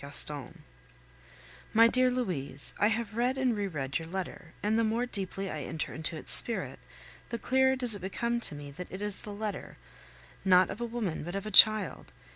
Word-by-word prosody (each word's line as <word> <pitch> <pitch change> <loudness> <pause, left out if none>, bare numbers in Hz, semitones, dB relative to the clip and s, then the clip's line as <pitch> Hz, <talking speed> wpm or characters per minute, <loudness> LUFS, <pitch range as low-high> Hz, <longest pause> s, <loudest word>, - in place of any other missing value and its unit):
GASTON 140 -1 -5 1.1
My 230 +1 +6
dear 255 +2 +2
Louise, 180 - -3
I 205 - +3
have 220 -1 -3
read 250 +3 0
and 255 -3 0
re 205 -1 -2
read 140 -5 -4
your 165 - -9
letter, 180 -2 -7
and 215 +2 +1
the - - +2
more 225 +3 -1
deeply 195 -3 -5
I 155 - -5
enter 160 +3 -5
into 160 +1 +3
its - - -3
spirit, 230 - +5 0.5
the 235 - -4
clearer 265 +2 +1
does 250 -3 0
it 200 - -9
become 235 +5 -2
to 195 - +2
me 145 -1 -9
that 180 +5 -10
it 190 +2 -7
is 205 -1 -3
the 210 - -9
letter, 205 -1 -6 0.7
not 185 -1 +4
of 205 +4 -8
a - - -1
woman, 225 -10 -4
but 175 +4 -6
of 195 - -5
a 215 - -6
child. 210 -6 +6
205 Hz, 200 wpm, -29 LUFS, 170-235 Hz, 1.1 s, My